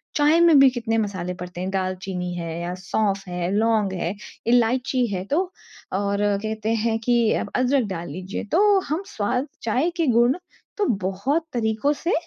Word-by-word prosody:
चाय 300 Hz, +3 st, +4 dB
में 335 Hz, -4 st, +6 dB
भी 270 Hz, -1 st, +8 dB
कितने 230 Hz, -2 st, -2 dB
मसाले 185 Hz, -4 st, -2 dB
पड़ते 180 Hz, 0 st, -7 dB
हैं 185 Hz, -, -2 dB
दाल 185 Hz, -1 st, -1 dB
चीनी 180 Hz, -2 st, -4 dB
है 170 Hz, -1 st, -4 dB
या 175 Hz, +1 st, -3 dB
सौंफ़ 195 Hz, +1 st, -1 dB
है, 175 Hz, 0 st, -2 dB
लॉन्ग 215 Hz, -2 st, +2 dB
है, 175 Hz, 0 st, -2 dB, 0.3 s
इलाइची 245 Hz, +2 st, +2 dB
है, 185 Hz, -1 st, -2 dB
तो 355 Hz, -, 0 dB, 0.4 s
और 200 Hz, +1 st, 0 dB, 0.3 s
कहते 220 Hz, +1 st, -1 dB
हैं 225 Hz, -1 st, +1 dB
कि 235 Hz, -1 st, +2 dB
आप -, -, -2 dB
अदरक 255 Hz, +1 st, +2 dB
डाल 175 Hz, -3 st, -5 dB
लीजिए, 185 Hz, +6 st, -5 dB
तो 390 Hz, -, +4 dB
हम 315 Hz, +5 st, 0 dB
स्वाद, 250 Hz, +7 st, -1 dB
चाय 250 Hz, +9 st, +1 dB
के 325 Hz, -4 st, +1 dB
गुण 240 Hz, +3 st, +4 dB, 0.4 s
तो 415 Hz, -, +1 dB, 0.2 s
बहुत 200 Hz, -, -1 dB
तरीकों 220 Hz, +4 st, +1 dB
से 335 Hz, +4 st, -2 dB
220 Hz, 175 wpm, -23 LUFS, 190-260 Hz, 0.4 s, भी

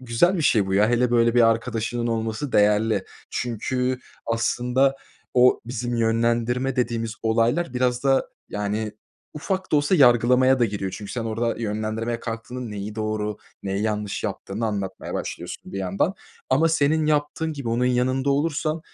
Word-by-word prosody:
güzel 130 Hz, +10 st, +2 dB
bir 165 Hz, -, -1 dB
şey 105 Hz, -8 st, +3 dB
bu, 95 Hz, -, -1 dB
ya. 105 Hz, +3 st, +4 dB
Hele 120 Hz, 0 st, +2 dB
böyle 115 Hz, 0 st, +3 dB
bir 120 Hz, -, +5 dB
arkadaşının 115 Hz, +1 st, 0 dB
olması 115 Hz, +4 st, -2 dB
değerli 105 Hz, 0 st, +3 dB, 0.3 s
çünkü 125 Hz, +2 st, -1 dB, 0.3 s
aslında 125 Hz, +4 st, +1 dB, 0.4 s
o 125 Hz, 0 st, +5 dB
bizim 120 Hz, 0 st, -3 dB
yönlendirme 120 Hz, +3 st, +1 dB
dediğimiz 115 Hz, -2 st, -1 dB
olaylar 120 Hz, +6 st, +1 dB
biraz 125 Hz, +1 st, 0 dB
da, 135 Hz, -1 st, +3 dB, 0.2 s
yani, 105 Hz, +1 st, -2 dB, 0.4 s
ufak 185 Hz, +4 st, -3 dB
da -, -, +6 dB
olsa 145 Hz, +6 st, +2 dB
yargılamaya 125 Hz, -1 st, +5 dB
da 120 Hz, -, +4 dB
giriyor. 100 Hz, -3 st, -3 dB
Çünkü 105 Hz, -2 st, -8 dB
sen 115 Hz, -2 st, -3 dB
orada 115 Hz, +1 st, -1 dB
yönlendirmeye 110 Hz, +2 st, -2 dB
kalktığının 120 Hz, +1 st, -5 dB
neyi 105 Hz, +1 st, -5 dB
doğru, 110 Hz, -1 st, -2 dB, 0.3 s
neyi 100 Hz, +1 st, -2 dB
yanlış 105 Hz, -2 st, -2 dB
yaptığını 110 Hz, +4 st, -3 dB
anlatmaya 100 Hz, -3 st, -4 dB
başlıyorsun -, -, -6 dB
bir 100 Hz, -, -3 dB
yandan 95 Hz, -, 0 dB, 0.4 s
ama 155 Hz, +5 st, +4 dB
senin 155 Hz, 0 st, +2 dB
yaptığın 155 Hz, +1 st, 0 dB
gibi 140 Hz, -5 st, -5 dB
onun 120 Hz, +2 st, +1 dB
yanında 130 Hz, +2 st, +1 dB
olursan, 155 Hz, +2 st, 0 dB
120 Hz, 150 wpm, -24 LUFS, 110-130 Hz, 0.4 s, da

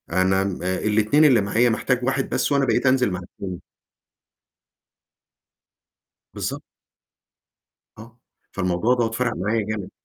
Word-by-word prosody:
أنا 95 Hz, +2 st, +2 dB
امم 95 Hz, -2 st, -3 dB
الاتنين 105 Hz, +9 st, +2 dB
اللي 125 Hz, -7 st, +5 dB
معايا، 115 Hz, +5 st, +2 dB
محتاج 125 Hz, +2 st, -1 dB
واحد 135 Hz, +1 st, -1 dB
بس، -, -, -1 dB
وأنا 140 Hz, -1 st, +2 dB
بقيت 130 Hz, -, 0 dB
أنزِل 130 Hz, -4 st, +3 dB
مع 90 Hz, -, -3 dB
التاني. 90 Hz, 0 st, -8 dB, 2.7 s
بالضبط. -, -, -4 dB, 1.4 s
آه 115 Hz, +2 st, -14 dB, 0.3 s
فالموضوع 90 Hz, +6 st, 0 dB
دوّة 115 Hz, -2 st, 0 dB
فرق 120 Hz, +1 st, -1 dB
معايا 105 Hz, +4 st, -1 dB
جامد. 105 Hz, -3 st, -5 dB
110 Hz, 120 wpm, -22 LUFS, 95-125 Hz, 2.7 s, اللي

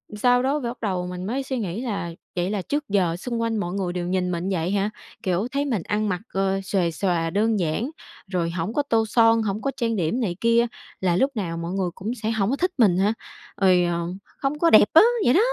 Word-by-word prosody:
sau 245 Hz, +3 st, +3 dB
đó 285 Hz, +3 st, +1 dB
phải 235 Hz, -, -1 dB
bắt -, -, -10 dB
đầu 185 Hz, -4 st, -1 dB
mình 180 Hz, 0 st, -5 dB
mới 260 Hz, +7 st, -2 dB
suy 260 Hz, -1 st, -3 dB
nghĩ 200 Hz, +2 st, -3 dB
là 200 Hz, -8 st, -3 dB, 0.2 s
"Vậy 175 Hz, +1 st, 0 dB
là 205 Hz, -2 st, -1 dB
trước 290 Hz, +5 st, -3 dB
giờ 180 Hz, -4 st, +2 dB
xung 235 Hz, +3 st, -3 dB
quanh 225 Hz, -1 st, 0 dB
mọi 175 Hz, -2 st, -2 dB
người 185 Hz, -3 st, -2 dB
đều 175 Hz, -1 st, -3 dB
nhìn 180 Hz, -1 st, 0 dB
mình 175 Hz, +3 st, -2 dB
như 190 Hz, -, 0 dB
vậy 165 Hz, +4 st, -1 dB
hả? 200 Hz, +1 st, +1 dB, 0.3 s
Kiểu, 185 Hz, +4 st, 0 dB
thấy 280 Hz, +1 st, 0 dB
mình 225 Hz, -, -1 dB
ăn 210 Hz, 0 st, -1 dB
mặc, 180 Hz, 0 st, -2 dB
ờ, 195 Hz, 0 st, +1 dB
xuề 185 Hz, -4 st, 0 dB
xòa 165 Hz, -1 st, 0 dB
đơn 210 Hz, +3 st, +1 dB
giản, 180 Hz, -, -1 dB, 0.4 s
rồi 170 Hz, -2 st, 0 dB
hổng 175 Hz, +5 st, -3 dB
có 290 Hz, -, +1 dB
tô 225 Hz, -1 st, +3 dB
son, 225 Hz, 0 st, +4 dB
hổng 210 Hz, 0 st, -2 dB
có 275 Hz, -, -1 dB
trang 230 Hz, -3 st, 0 dB
điểm 195 Hz, +8 st, 0 dB
này 180 Hz, -6 st, -1 dB
kia, 230 Hz, +1 st, +4 dB, 0.3 s
là 180 Hz, -2 st, +1 dB
lúc 270 Hz, +8 st, +2 dB
nào 170 Hz, -5 st, -3 dB
mọi 170 Hz, +1 st, -4 dB
người 190 Hz, -2 st, 0 dB
cũng 215 Hz, +6 st, -4 dB
sẽ 220 Hz, -, +1 dB
hổng 210 Hz, -2 st, 0 dB
có 275 Hz, -, +1 dB
thích 365 Hz, +4 st, 0 dB
mình 200 Hz, -7 st, +4 dB
hả? 205 Hz, +4 st, +2 dB, 0.5 s
Rồi, 180 Hz, -2 st, +5 dB
ờ, 170 Hz, 0 st, 0 dB, 0.4 s
hông 290 Hz, +2 st, 0 dB
có 335 Hz, -, +4 dB
đẹp 215 Hz, -, +7 dB
á," 325 Hz, -, +9 dB, 0.2 s
vậy 245 Hz, -, +5 dB
đó. 360 Hz, -, +5 dB
200 Hz, 250 wpm, -24 LUFS, 180-230 Hz, 0.5 s, á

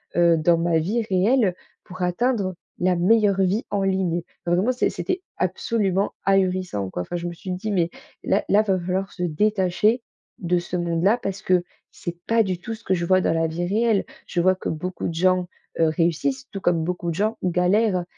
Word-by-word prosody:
heu, 170 Hz, -1 st, +5 dB
dans 165 Hz, +2 st, +3 dB
ma 165 Hz, -1 st, +2 dB
vie 220 Hz, +8 st, 0 dB
réelle 195 Hz, +1 st, +3 dB, 0.3 s
pour 185 Hz, 0 st, -10 dB
atteindre 190 Hz, 0 st, 0 dB, 0.3 s
la 180 Hz, -1 st, +3 dB
meilleure 200 Hz, +2 st, +3 dB
vie 195 Hz, +5 st, +1 dB
en 200 Hz, -1 st, 0 dB
ligne. 185 Hz, -3 st, 0 dB, 0.2 s
Enfin 175 Hz, 0 st, +2 dB
vraiment 210 Hz, +8 st, +2 dB
c 250 Hz, -, +1 dB
c'était 370 Hz, 0 st, -3 dB, 0.2 s
absolument, 195 Hz, +1 st, 0 dB
ahurissant 185 Hz, -, +1 dB
quoi, 90 Hz, -, -4 dB
enfin, 175 Hz, -, -6 dB
je 175 Hz, 0 st, -3 dB
me 170 Hz, -, -4 dB
suis 185 Hz, +2 st, -7 dB
dit: 195 Hz, +4 st, -3 dB
«Mais 170 Hz, -3 st, +1 dB, 0.3 s
là -, -, +1 dB
là, 205 Hz, +2 st, +5 dB
va 190 Hz, -3 st, +1 dB
falloir 185 Hz, +2 st, -2 dB
se 180 Hz, -, -8 dB
détacher 210 Hz, +6 st, +1 dB, 0.4 s
de 180 Hz, 0 st, +1 dB
ce 175 Hz, +1 st, -5 dB
monde-là, 175 Hz, +6 st, +2 dB
parce 195 Hz, +1 st, -4 dB
que 180 Hz, -1 st, +3 dB, 0.3 s
c'est 175 Hz, 0 st, -6 dB
pas 230 Hz, 0 st, +4 dB
du 185 Hz, -3 st, -3 dB
tout 225 Hz, +4 st, -5 dB
ce 230 Hz, -, -18 dB
que 190 Hz, -, 0 dB
je 170 Hz, 0 st, -2 dB
vois 185 Hz, +1 st, +4 dB
dans -, -, +1 dB
la 165 Hz, 0 st, +1 dB
vie 170 Hz, +2 st, -3 dB
réelle. 220 Hz, +1 st, +2 dB, 0.2 s
Je 175 Hz, -, 0 dB
vois 185 Hz, +1 st, +4 dB
que -, -, -5 dB
beaucoup 180 Hz, +4 st, -4 dB
de -, -, -4 dB
gens, 185 Hz, +1 st, +2 dB, 0.3 s
heu, 160 Hz, -1 st, +4 dB
réussissent 175 Hz, -, 0 dB
tout 195 Hz, -, -5 dB
comme 170 Hz, -2 st, +2 dB
beaucoup 175 Hz, 0 st, -2 dB
de -, -, -5 dB
gens 215 Hz, +4 st, 0 dB
galèrent» 180 Hz, +2 st, +2 dB
185 Hz, 205 wpm, -23 LUFS, 175-205 Hz, 0.4 s, heu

